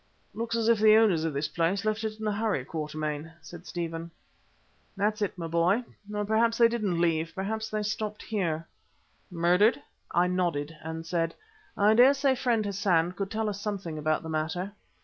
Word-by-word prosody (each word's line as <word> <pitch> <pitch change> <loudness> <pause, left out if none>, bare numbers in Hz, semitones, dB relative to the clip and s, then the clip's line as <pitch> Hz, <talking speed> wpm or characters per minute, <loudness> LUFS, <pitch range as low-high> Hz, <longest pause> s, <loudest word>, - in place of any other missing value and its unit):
"Looks 230 0 -3
as 230 -1 +1
if 230 -2 +4
the 215 0 +7
owners 200 -8 +4
of 160 - -1
this 140 +2 -1
place 175 +4 0
had - - -10
left 215 +1 -3
it 215 0 -4
in 220 - -5
a 210 - +1
hurry, 205 - -1
Quatermain," 155 0 -4
said 175 0 -11
Stephen. 165 -1 -4 0.9
"That's 210 +1 0
it, 200 -2 -1
my 170 - -4
boy. 170 +8 +2 0.3
Or 210 0 -2
perhaps 225 +2 +2
they 235 - +7
didn't 215 -7 -1
leave; 165 -1 +1
perhaps 220 +3 -3
they 215 -1 -2
stopped 210 0 -3
here." 165 -7 -2 0.6
"Murdered?" 180 +5 +3 0.3
I 175 +1 +3
nodded 170 -4 -1
and 160 +1 -5
said, 165 -1 -1 0.4
"I 205 +2 +5
dare 250 +5 +7
say 275 -1 +2
friend 240 -4 0
Hassan 190 -4 +1
could 195 +2 -4
tell 220 +1 -1
us 200 -1 -3
something 195 -7 -4
about 155 +1 0
the 160 - -6
matter. 160 +5 -2
195 Hz, 190 wpm, -28 LUFS, 165-215 Hz, 0.9 s, the